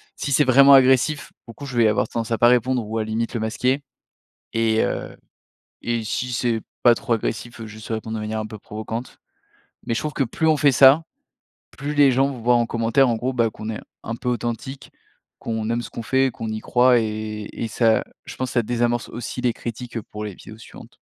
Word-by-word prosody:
si 140 - -4
c'est 150 - +5
vraiment 140 +2 +7
agressif, 135 +3 +4
pour 115 - -11
le - - -32
coup 140 - -9
je 125 - -6
vais 115 -2 +5
avoir 105 -1 +1
tendance 115 -1 -3
à 115 - +1
pas 120 - +6
répondre 125 -1 +2
ou 110 +1 -3
à - - 0
limite 115 +2 -2
le - - 0
masquer. 125 +5 0 0.7
Et 115 -1 +2
heu, - - -4 0.7
et 115 -1 -2
si 125 +4 -3
c'est 115 -2 0 0.2
pas 120 -1 +7
trop 120 - -2
agressif, 115 +1 -3
heu, - - -6
juste 110 +1 -11
répondre 110 0 -3
de 110 - -4
manière 110 +1 -3
un 110 - -3
peu 110 - -9
provocante. 110 +4 -6 0.7
Mais - - 0
je - - 0
trouve 150 -1 -4
que 135 - +1
plus 160 +7 -1
on 155 - +4
fait 145 -1 +4
ça, 135 +5 +7 0.8
plus 145 +2 -3
les 145 -3 +5
gens 135 +2 +2
voient 120 -1 +2
en 120 -1 +2
commentaire 115 +3 +2
en 115 - +1
gros, 125 +4 -2
bah, 115 -2 +2
qu'on 110 +1 -7
est 110 - -5 0.2
un 115 - -3
peu 125 - -5
authentique, 120 +3 -4 0.5
qu'on 110 0 -3
aime 120 - 0
ce - - -8
qu'on 115 - -6
fait, 130 +3 +2
qu'on 115 -1 -6
y 110 0 -4
croit 125 0 +4
et 110 -1 -4
et 115 - -4
ça 110 0 +2 0.2
je - - -9
pense 130 -1 -3
ça 120 - +2
désamorce 120 +1 -1
aussi 120 +2 -5
les 125 -2 +2
critiques 120 0 -6
pour 105 +1 -8
les 105 -3 -6
vidéos 110 +1 -13
suivantes. - - -14
120 Hz, 225 wpm, -22 LUFS, 110-130 Hz, 0.8 s, vraiment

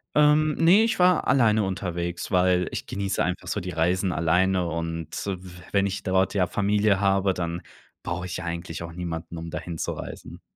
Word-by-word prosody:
Ähm, 150 +1 +4
ne, 180 +6 +6
ich 225 -3 0
war 180 -1 +4
alleine 110 -5 +4
unterwegs, 90 -2 -3
weil 90 -1 +3
ich - - -5
genieße 100 -1 -1
einfach 90 +1 -3
so 105 - -1
die 90 0 -5
Reisen 90 +3 +1
alleine. 90 +3 +2
Und 85 -1 -3 0.2
w 90 -2 -6
wenn 100 -1 +3
ich 100 0 -3
dort 95 +1 +1
ja 90 -3 +2
Familie 105 0 +2
habe, 95 -1 +2
dann 85 -1 -3 0.4
brauche 85 +1 -4
ich 90 - -5
ja 90 - -6
eigentlich 85 -1 -5
auch 85 0 -7
niemanden, 85 -1 -5
um 85 0 -6
dahin 85 +1 -5
zu - - -2
reisen. - - -8
90 Hz, 190 wpm, -25 LUFS, 85-100 Hz, 0.4 s, ne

